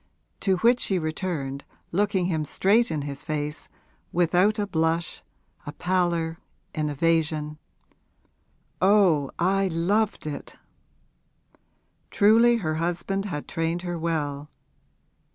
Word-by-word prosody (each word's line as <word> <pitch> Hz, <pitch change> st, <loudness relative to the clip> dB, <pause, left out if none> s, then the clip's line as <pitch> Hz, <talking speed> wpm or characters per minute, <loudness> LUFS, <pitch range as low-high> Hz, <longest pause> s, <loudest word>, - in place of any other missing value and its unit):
To 190 Hz, -2 st, +1 dB
which 240 Hz, +6 st, +4 dB
she 190 Hz, -, +1 dB
returned, 155 Hz, -4 st, -3 dB, 0.3 s
looking 195 Hz, 0 st, +1 dB
him 160 Hz, -4 st, 0 dB
straight 205 Hz, +10 st, +2 dB
in 155 Hz, -3 st, -2 dB
his 140 Hz, -1 st, -5 dB
face, 150 Hz, -1 st, -3 dB, 0.4 s
without 180 Hz, +5 st, +3 dB
a 205 Hz, -, 0 dB
blush, 165 Hz, -2 st, -1 dB, 0.5 s
a -, -, -3 dB
pallor, 170 Hz, -2 st, 0 dB, 0.3 s
an 155 Hz, -1 st, -1 dB
evasion, 155 Hz, 0 st, 0 dB, 1.2 s
'Oh, 185 Hz, -8 st, +4 dB
I 195 Hz, +2 st, +2 dB
loved 190 Hz, +5 st, 0 dB
it!' 150 Hz, -2 st, -6 dB, 1.5 s
Truly 225 Hz, +3 st, +5 dB
her 155 Hz, -8 st, -1 dB
husband 175 Hz, +3 st, -1 dB
had 150 Hz, -7 st, -5 dB
trained 165 Hz, +1 st, -2 dB
her 175 Hz, -2 st, -3 dB
well. 150 Hz, -3 st, -2 dB
170 Hz, 110 wpm, -25 LUFS, 155-195 Hz, 1.5 s, Truly